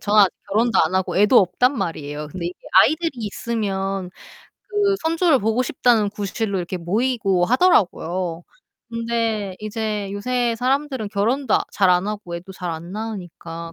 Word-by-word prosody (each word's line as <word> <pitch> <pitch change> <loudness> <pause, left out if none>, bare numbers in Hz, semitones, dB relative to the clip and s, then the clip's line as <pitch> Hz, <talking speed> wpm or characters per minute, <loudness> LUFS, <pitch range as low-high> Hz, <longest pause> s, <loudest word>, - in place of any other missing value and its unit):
저는 210 0 +4
아직 190 - +4 0.2
결혼도 220 0 +2
안 160 +4 0
하고 190 0 0
애도 210 +5 +6
없단 250 +8 +2
말이에요. 150 -4 -4
근데 170 +2 -5
이게 180 - -5 0.2
아이들이 320 - +2
있으면 195 -3 -3 0.6
그 410 -2 +2
선조를 325 - +3
보고 225 +4 +1
싶다는 235 -4 +2
구실로 205 0 -3
이렇게 180 +1 -4
모이고 200 0 +1
하더라고요. 185 - +1 0.5
근데 230 -4 -2
이제 215 -2 -3
요새 240 +2 -1
사람들은 260 -3 -1
결혼도 230 +5 0
아 - - +2
잘 190 -3 +3
안 180 +2 +3
하고 205 -5 -5
애도 180 +3 -10
잘 180 -2 -5
안 170 +3 -7
낳으니까 175 -6 -6
210 Hz, 340 characters per minute, -22 LUFS, 185-240 Hz, 0.6 s, 애도